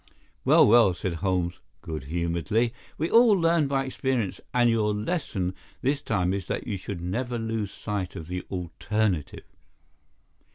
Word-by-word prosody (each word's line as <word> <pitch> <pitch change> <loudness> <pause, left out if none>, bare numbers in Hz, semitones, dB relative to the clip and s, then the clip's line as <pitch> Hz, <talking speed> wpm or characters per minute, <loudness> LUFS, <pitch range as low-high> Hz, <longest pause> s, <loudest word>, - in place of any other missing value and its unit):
"Well, - - +6
well," 110 -4 +6
said 90 -1 -3
Holmes, 90 -3 0 0.2
good 80 -4 -5
humouredly. 85 - 0 0.2
"We 160 +3 -1
all 230 -1 +7
learn 165 -3 +3
by 135 -1 0
experience, 130 -5 -2
and 120 -1 +3
your 110 -2 +2
lesson 105 - -2 0.3
this 140 +2 +1
time 95 -7 0
is 95 -4 -3
that - - -3
you 100 - -2
should 95 -1 -6
never 120 +8 -2
lose 115 -3 -2
sight 100 -4 -4
of 80 - -7
the 90 +1 -3
alternative. 95 0 -2
105 Hz, 150 wpm, -26 LUFS, 90-120 Hz, 0.3 s, all